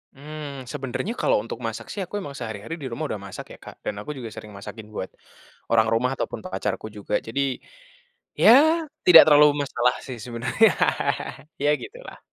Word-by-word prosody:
Mmm, 145 -1 -8
sebenarnya 145 - -3
kalau - - +3
untuk 115 +1 -7
masak 115 -2 -5
sih 205 - -5
aku 190 +2 -5
emang 145 - -7
sehari-hari 110 +5 -5
di 135 - -5
rumah 130 +6 -5
udah 105 - -3
masak 100 - -8
ya, - - -12
Kak, - - -10
dan 105 - -3
aku 130 - -6
juga 120 -3 -6
sering 105 - -10
masakin 105 +2 -9
buat 95 - -4 0.6
orang 110 -1 +4
rumah 125 +3 +1
ataupun - - -3
pacarku - - -3
juga. 105 0 -5
Jadi, 115 +5 -3 1.0
ya 220 - +9 0.5
tidak 165 -3 +11
terlalu 150 0 +7
masalah 125 -3 +1
sih 125 -3 -6
sebenarnya 125 - +2 0.9
ya 145 - +4
gitulah. - - -10
125 Hz, 170 wpm, -24 LUFS, 115-150 Hz, 1.0 s, tidak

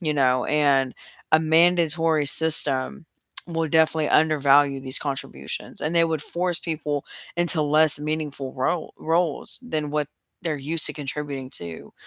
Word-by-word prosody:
you 155 -4 -1
know, 130 -2 +1
and 140 -4 +1 0.4
a 155 - +5
mandatory 160 -1 +2
system 145 -2 +4 0.4
will 165 -2 -3
definitely 160 0 +2
undervalue 145 -3 +3
these 130 -1 -3
contributions, 140 -2 -6
and 155 +3 -3
they 170 - +4
would 160 -2 -2
force 175 +2 -2
people 150 -3 -4 0.3
into 175 -2 +1
less 150 0 +4
meaningful 150 -3 -5
role 155 +5 -2
roles 165 -1 0
than 155 -12 -4
what 150 -1 -2 0.3
they're 160 -3 -3
used 155 +3 +1
to - - 0
contributing 140 -2 -6
to, 85 -7 -7
150 Hz, 140 wpm, -23 LUFS, 140-160 Hz, 0.4 s, a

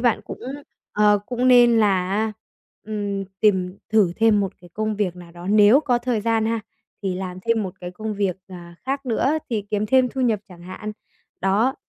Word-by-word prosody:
bạn 240 -3 +2
cũng, - - -8 0.5
ờ, 210 0 +4
cũng 250 +1 0
nên 240 -2 +6
là 190 -3 +2
á, 215 +2 0 0.5
ừm, 205 -2 -3 0.2
tìm 190 -3 +2
thử 210 -5 +3
thêm 220 -2 +4
một 195 -1 -2
cái 175 -1 -16
công 215 -1 -1
việc 185 -4 -1
nào 175 -1 -12
đó. 175 +1 -10
Nếu 210 +6 +6
có 250 -5 +1
thời 240 -3 -1
gian 225 0 +1
ha, 225 0 0 0.4
thì 190 -2 -1
làm 185 -1 -5
thêm 230 -1 +1
một 185 -2 -5
cái 175 - -6
công 215 +4 -5
việc, 195 -3 -1
à, 175 -2 -11
khác 275 0 -3
nữa 270 +6 +1
thì 215 -3 -1
kiếm 210 0 0
thêm 255 +2 +4
thu 265 - -5
nhập 225 -5 +2
chẳng 175 -2 -14
hạn. 185 +4 -7 0.5
Đó, 215 +8 +2
210 Hz, 200 wpm, -22 LUFS, 190-230 Hz, 0.5 s, nên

